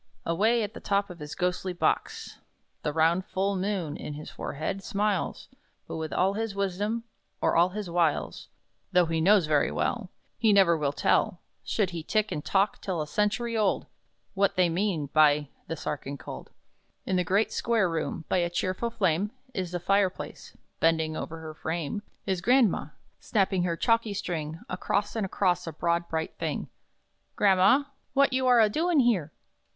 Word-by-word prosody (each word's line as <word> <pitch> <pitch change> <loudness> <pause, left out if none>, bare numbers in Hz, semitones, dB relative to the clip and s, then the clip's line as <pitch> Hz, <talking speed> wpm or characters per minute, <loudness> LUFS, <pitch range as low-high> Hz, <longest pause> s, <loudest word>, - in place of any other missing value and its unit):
Away 220 +7 +2
at 210 - -4
the - - -8
top 200 -1 0
of 175 - -11
his 150 0 -7
ghostly 180 +1 -1
box; 175 - -1 0.4
The 150 - -1
round 165 +4 +2
Full 195 +2 -1
Moon 185 -5 -2
(in 150 - -6
his 150 - -8
forehead) 155 +7 -4
smiles; 205 -3 -1 0.4
But - - -5
with 160 -1 -4
all 190 +2 +2
his 220 -1 -3
wisdom, 200 +4 -1 0.4
or - - +1
all 175 +2 +5
his 205 +1 -5
wiles, 170 -3 0 0.4
Though 180 -1 +5
he 165 0 -1
knows 195 0 +5
very 150 -2 +2
well, 230 -6 -2 0.3
He 220 -2 +4
never 190 -4 +5
will 150 -3 0
tell 170 +4 +1 0.2
Should 200 -4 0
he 170 -2 -4
tick 215 +6 0
and 150 - -3
tock 195 +1 +1
till 185 -4 -2
a 155 - -1
century 210 +7 0
old 210 -3 +1 0.5
What 200 0 +2
they 180 -1 +3
mean 175 -3 0
by 150 -2 +4 0.2
The 165 - -3
Sa - - -3
archinkold! 140 -1 -7 0.6
In 190 - 0
the 180 - +2
great, 195 +5 +1
square 225 -5 +1
room, 160 -1 -3
by - - +1
a 175 -1 +1
cheerful 185 +6 -1
flame 200 -4 +1 0.2
In 185 -1 -2
the 175 0 -3
fire 195 +2 +3
place, - - -10 0.2
bending 160 -1 +2
above - - -4
her 160 -1 -8
frame, 160 +4 -3 0.2
Is 190 -3 -1
grandma, 240 - +3 0.3
snapping 195 -3 +1
her 170 -2 -1
chalky 230 -1 +1
string 165 -5 -4
Across 200 +3 -1
and 215 -4 -1
across 180 -2 0
a - - -2
broad, 170 +2 -1
bright 160 0 -2
thing. - - -3 0.7
"Gramma, 205 +9 +4 0.2
what 275 -1 +4
you 260 0 +1
are 245 -1 +6
a 220 - +6
doin' 320 +6 +2
here?" 195 - +1
185 Hz, 175 wpm, -28 LUFS, 165-210 Hz, 0.7 s, are